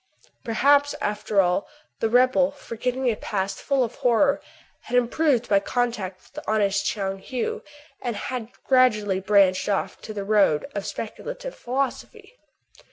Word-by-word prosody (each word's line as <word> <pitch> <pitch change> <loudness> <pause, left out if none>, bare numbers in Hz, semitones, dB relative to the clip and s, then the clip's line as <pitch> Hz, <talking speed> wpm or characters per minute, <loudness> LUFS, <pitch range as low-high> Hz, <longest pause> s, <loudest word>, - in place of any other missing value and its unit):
Perhaps, 285 +5 +3
after 210 -1 +1
all, 180 +1 0 0.3
the 225 - +1
rebel, 255 +3 +4
forgetting 255 -2 -4
a 230 - +2
past 195 -2 -3
full 275 -2 +1
of 230 - -5
horror, 280 +3 +3 0.4
had 250 - 0
improved 245 0 +2
by 200 -1 +4
contact 205 -6 -2
with - - -22
the 300 -6 -4
honest 200 -2 +1
Tchoung 195 -2 -2
Heou, 250 +2 -3 0.4
and 240 -3 -3
had 240 +1 -4
gradually 215 -7 +3
branched 195 -1 +3
off 200 - -1
to - - -8
the 205 -2 -4
road 200 -8 +3
of 200 - -4
speculative - - -6
philosophy. 275 - -4
230 Hz, 145 wpm, -24 LUFS, 200-260 Hz, 0.4 s, rebel